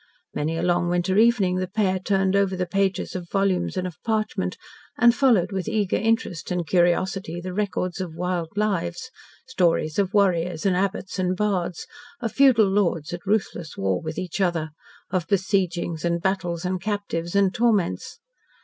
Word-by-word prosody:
Many 160 +2 -2
a 165 - -2
long 175 0 +1
winter 175 +1 0
evening 215 -6 +3
the 185 0 -1
pair 190 -1 0
turned 195 0 +1
over 195 -1 +2
the 180 0 -1
pages 195 +1 -1
of 175 -2 -5
volumes 195 -2 0
and 185 - -1
of 180 -3 -7
parchment, 220 -1 -1 0.4
and 240 -1 +6
followed 245 -8 +3
with 190 -3 -3
eager 205 -4 0
interest 225 -6 -1
and 180 -1 -1
curiosity 175 0 +1
the 180 +1 -6
records 185 -2 -2
of 170 -4 -5
wild 175 -1 -2
lives 200 +2 -1 0.3
stories 175 -8 +1
of 195 -2 +1
warriors 180 -5 +1
and 190 -2 +3
abbots 190 0 -2
and 185 0 0
bards, 185 -5 -1 0.3
of 230 -3 -3
feudal 260 -6 +5
lords 175 -6 0
at 175 +3 -7
ruthless 195 -6 -1
war 95 -1 0
with 155 0 -5
each 185 +2 -3
other, 165 -4 0 0.4
of 180 -3 -1
besiegings 185 -4 0
and 170 0 +1
battles 180 -3 -1
and 185 0 -2
captives 200 -4 -3
and 195 -2 +3
torments. 220 -7 0
185 Hz, 165 wpm, -24 LUFS, 175-200 Hz, 0.4 s, and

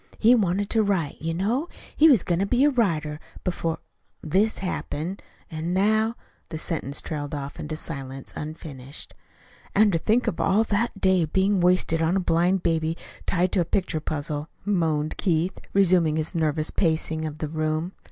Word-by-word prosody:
He 230 +3 +6
wanted 200 -3 +2
to 225 - +4
write, 190 -8 -1
you 165 +1 -2
know. 235 - 0 0.3
He 320 +2 +7
was 250 - +5
goin' 175 -1 0
to 195 - +1
be 245 +5 +3
a 295 - +4
writer, 155 - 0 0.2
before 165 -3 -1 0.5
this 195 +8 +2
happened. 180 -1 -4 0.3
An' 165 +3 -2
now 220 +3 +2 0.2
" - - -38
The 160 - -4
sentence 155 -4 -3
trailed 150 -2 -4
off 140 -1 -6
into 150 - -5
the - - -6
silence 135 -2 -6
unfinished. 150 -3 -8 0.6
"And 205 -1 +5
to 165 - +2
think 220 +8 +2
of 210 -8 -1
all 200 +3 +3
that 220 +2 0
to - - -12
day 190 -3 +3
being 190 +4 +2
wasted 175 -2 +2
on 165 +3 +2
a - - +3
blind 175 +1 +2
baby 165 -1 0 0.3
tied 180 +1 +1
to 185 - +2
a - - +3
picture 180 -1 -1
puzzle," 150 0 -3 0.2
moaned 160 -6 0
Keith, 175 0 0
resuming 180 -5 +4
his 155 +2 -1
nervous 155 -2 0
pacing 160 -2 0
of 155 -1 -5
the 155 - -3
room. 155 +2 -1
170 Hz, 180 wpm, -25 LUFS, 155-195 Hz, 0.6 s, He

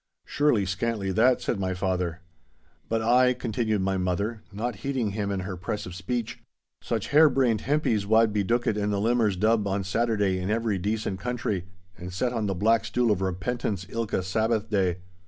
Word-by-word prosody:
'Surely 145 -9 +2
scantly 95 +1 -2
that!' 120 +6 +3
said 110 - -1
my 95 -1 -1
father. 90 -2 -2 0.7
'But 115 0 0
ay,' 125 +2 +4
continued 110 -3 -1
my 95 0 0
mother, 100 +5 -1
not 110 +2 -3
heeding 125 -2 -2
him 100 0 -2
in 100 -2 -2
her 95 0 -5
press 90 +4 -4
of 90 - -8
speech, 115 +5 -3 0.4
'such - - -3
hair 155 +1 +7
brained 125 -5 +2
hempies 125 -8 0
wad 110 0 +4
be 105 -1 +1
dookit 120 +1 +1
in 105 0 0
the 100 -1 0
Limmers' 110 -2 +2
Dub 110 0 +2
on 100 0 -1
Saturday 100 -2 0
in 90 +2 -3
every 110 -3 0
decent 105 0 -2
country, 115 -6 -2 0.3
and 90 +1 -7
set 120 +7 -1
on 110 -3 -1
the 95 - -1
black 110 +4 +3
stool 120 0 +1
of 100 -2 0
repentance 95 +1 -2
ilka 115 -5 -1
Sabbath 110 +3 0
day. 95 -4 +1
105 Hz, 185 wpm, -26 LUFS, 95-115 Hz, 0.7 s, hair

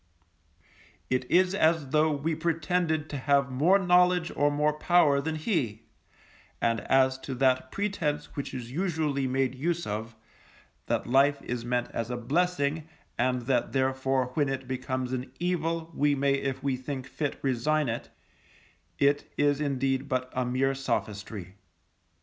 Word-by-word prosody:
It 130 0 0
is 185 +1 +4
as 160 -6 +2
though 155 +2 +3
we 150 +3 -1
pretended 165 -1 0
to 145 - -3
have 140 0 +2
more 160 +10 +4
knowledge 180 -2 +3
or 145 0 +3
more 150 +1 +1
power 150 -3 +3
than 160 +2 -2
he; 135 - -1 0.8
and 115 -1 +1
as 130 +3 +2
to 130 0 -5
that 130 0 +2
pretence 190 -8 -2
which 140 - -4
is 125 -2 -6
usually 155 -4 -1
made 130 0 0
use 170 +6 -2
of, 110 +2 -4 0.7
that - - 0
Life 140 +3 +3
is 120 -1 -4
meant 120 0 -1
as 115 0 -3
a 125 - -2
blessing, 155 +3 0 0.3
and 125 0 +1
that 125 -1 0
therefore 130 -1 0
when 145 -1 +1
it 135 -1 -4
becomes 130 0 -3
an 130 +1 -4
evil, 165 -2 -1
we 145 0 +2
may 140 0 +2
if 135 -1 -2
we 135 -2 0
think 130 0 -5
fit 145 +1 -3
resign 140 +3 +1
it, 115 0 -4 0.9
it 140 +1 +2
is 145 0 +2
indeed 135 -1 -1
but 130 -1 -1
a 130 - +1
mere 135 +2 +1
sophistry. 105 -7 -4
140 Hz, 150 wpm, -28 LUFS, 130-155 Hz, 0.9 s, is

